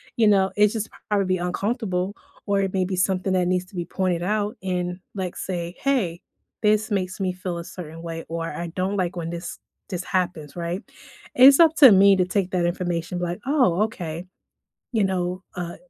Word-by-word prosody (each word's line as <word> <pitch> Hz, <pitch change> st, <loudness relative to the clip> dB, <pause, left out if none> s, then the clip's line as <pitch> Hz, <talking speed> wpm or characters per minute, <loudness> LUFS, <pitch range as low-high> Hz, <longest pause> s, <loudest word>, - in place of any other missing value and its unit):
you 225 Hz, -2 st, +4 dB
know? 195 Hz, -2 st, +4 dB
It's 210 Hz, +1 st, +4 dB
just 220 Hz, -1 st, -3 dB, 0.2 s
probably 190 Hz, -3 st, +2 dB
uncomfortable, 190 Hz, +1 st, -2 dB, 0.3 s
or 200 Hz, -1 st, +2 dB
it 195 Hz, -1 st, -2 dB
may 190 Hz, -, +1 dB
be 185 Hz, +1 st, -2 dB
something 185 Hz, +1 st, +1 dB
that 180 Hz, -1 st, +2 dB
needs 180 Hz, 0 st, 0 dB
to 185 Hz, -, -17 dB
be 175 Hz, -1 st, -2 dB
pointed 180 Hz, -3 st, -1 dB
out, 210 Hz, +2 st, -1 dB
in, 180 Hz, -1 st, -2 dB
like, 185 Hz, -3 st, -4 dB
say, 175 Hz, -1 st, -4 dB
"Hey, 210 Hz, -12 st, 0 dB, 0.4 s
this 215 Hz, 0 st, +3 dB
makes 185 Hz, -2 st, -2 dB
me 185 Hz, -2 st, 0 dB
feel 180 Hz, -1 st, -5 dB
a -, -, -5 dB
certain 165 Hz, -2 st, -9 dB
way," 165 Hz, -1 st, -6 dB
or 165 Hz, 0 st, -3 dB
"I 170 Hz, 0 st, -5 dB
don't 190 Hz, +2 st, -1 dB
like 180 Hz, -2 st, -1 dB
when 165 Hz, -1 st, -4 dB
this 170 Hz, 0 st, -6 dB, 0.3 s
this 180 Hz, -1 st, -3 dB
happens," 175 Hz, -5 st, -2 dB
right? 175 Hz, +3 st, -3 dB, 0.5 s
It's 270 Hz, +4 st, +8 dB
up 320 Hz, -1 st, +6 dB
to 270 Hz, -7 st, +9 dB
me 195 Hz, 0 st, +7 dB
to 185 Hz, -, +2 dB
take 185 Hz, 0 st, -1 dB
that 175 Hz, -2 st, +1 dB
information, 175 Hz, 0 st, -2 dB
like, 175 Hz, +2 st, -3 dB
"Oh, 250 Hz, -, +3 dB
okay." 175 Hz, -6 st, -4 dB, 0.7 s
You 215 Hz, -4 st, +2 dB
know, 180 Hz, -1 st, -1 dB
uh, 175 Hz, -1 st, -5 dB
185 Hz, 195 wpm, -24 LUFS, 175-200 Hz, 0.7 s, to